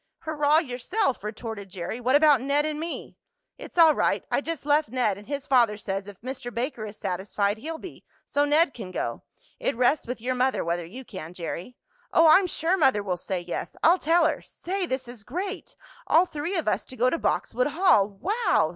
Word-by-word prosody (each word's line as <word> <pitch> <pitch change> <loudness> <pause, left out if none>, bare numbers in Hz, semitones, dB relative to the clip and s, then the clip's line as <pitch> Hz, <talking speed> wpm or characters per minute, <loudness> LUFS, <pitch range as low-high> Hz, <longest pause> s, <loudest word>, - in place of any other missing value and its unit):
"Hurrah 305 -1 +2
yourself!" 270 - -1
retorted 215 -2 -6
Jerry. 185 +5 -5
"What 250 +3 +2
about 290 -4 +6
Ned 285 +3 +1
and 305 -1 -2
me?" 330 +2 -6 0.4
"It's - - -10
all 325 -2 +8
right. - - 0
I - - +2
just 325 -1 -5
left 295 -3 +3
Ned, 245 -5 +1
and 205 +2 -13
his 285 -1 -4
father 235 -5 +3
says 195 -1 -4
if 200 -2 -11
Mr. 255 0 -6
Baker 235 -2 -3
is 210 - -10
satisfied 200 +2 -1
he'll 320 +6 -5
be, 370 - -11 0.2
so 285 - +1
Ned 295 +1 +3
can 210 -6 -7
go. 185 - -3 0.4
It - - -1
rests 250 +3 +2
with 250 0 -4
your 250 +3 -1
mother 255 -4 +1
whether 170 0 -2
you 250 +9 -9
can, 180 -5 -8
Jerry." 180 +7 -6 0.3
"Oh, 330 0 +6
I'm 370 +4 +6
sure 345 +2 0
mother 265 - +3
will 185 -3 -1
say 180 +1 -4
yes! 175 0 -5
I'll 345 +3 +6
tell 330 +2 +3
her! - - 0
Say! 375 +1 -4
this 260 -3 -3
is 240 -4 -10
great 370 - -5 0.3
all 340 +3 +5
three 335 +3 -3
of 325 - -2
us - - +1
to 255 - -11
go 250 +1 +3
to 335 - -1
Boxwood - - 0
Hall! 355 - +4
Wow!" 350 - +1
260 Hz, 205 wpm, -26 LUFS, 210-320 Hz, 0.4 s, all